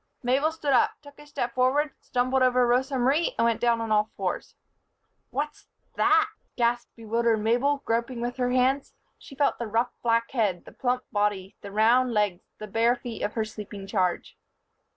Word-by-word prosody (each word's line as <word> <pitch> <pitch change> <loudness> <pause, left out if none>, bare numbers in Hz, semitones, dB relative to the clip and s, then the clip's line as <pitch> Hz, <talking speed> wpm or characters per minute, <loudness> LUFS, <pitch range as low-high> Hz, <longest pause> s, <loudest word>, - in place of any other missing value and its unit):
Mabel 270 +6 +2
stood 300 -3 -1
up, 250 - +4
took 285 0 -15
a 295 - -14
step 255 -5 -3
forward, 265 +3 +2
stumbled 255 +1 0
over 250 -1 +4
Rosa 260 +3 +1
Marie 275 +7 +2
and 230 - +3
went 230 -1 +1
down 235 -1 +3
on 225 -1 -3
all 210 0 +3
fours. - - -3 0.7
"What's 295 +1 -4 0.3
that!" 420 +1 +4 0.3
gasped 240 0 0
bewildered 230 0 +1
Mabel, 245 +6 +1
groping 235 +2 -1
with 245 +1 -3
her 250 -1 0
hands. 255 +2 +1 0.2
She 275 - -13
felt 285 +1 +1
the 235 - -3
rough 230 +3 0
black 230 0 +1
head, 210 -8 0
the - - -12
plump 250 0 -1
body, 205 -2 -1
the 200 - -8
round 235 +4 +3
legs, 205 -4 +1 0.2
the 215 - -7
bare 225 +4 +2
feet 240 -2 -7
of 210 - -2
her 220 -2 -1
sleeping 210 -2 -8
charge. 185 -3 -1
240 Hz, 180 wpm, -26 LUFS, 220-260 Hz, 0.7 s, up